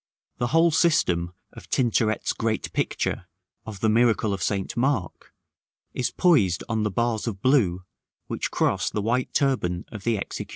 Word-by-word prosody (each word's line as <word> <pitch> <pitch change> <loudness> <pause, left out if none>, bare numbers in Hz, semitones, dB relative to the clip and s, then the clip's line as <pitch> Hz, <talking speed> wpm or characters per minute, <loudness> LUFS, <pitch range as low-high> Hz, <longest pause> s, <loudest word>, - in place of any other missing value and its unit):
The 120 - +1
whole 165 +5 +4
system 90 - +2 0.2
of - - -13
Tintoret's 115 -4 +1
great 110 -1 -2
picture - - -2 0.4
of 105 -3 -8
the 110 - +2
Miracle 110 -2 +3
of 95 - -4
St. 95 +1 -2
Mark 120 -7 -1 0.6
is 125 - -1
poised 115 - +2
on 110 -2 -1
the 105 - 0
bars 115 +2 -1
of 100 -4 -3
blue, 95 -9 +2 0.4
which - - -3
cross - - 0
the 105 - -3
white 125 +3 0
turban 95 -11 0
of 110 -4 -8
the 115 -2 +1
executioner. 100 - -5
110 Hz, 160 wpm, -25 LUFS, 100-125 Hz, 0.6 s, whole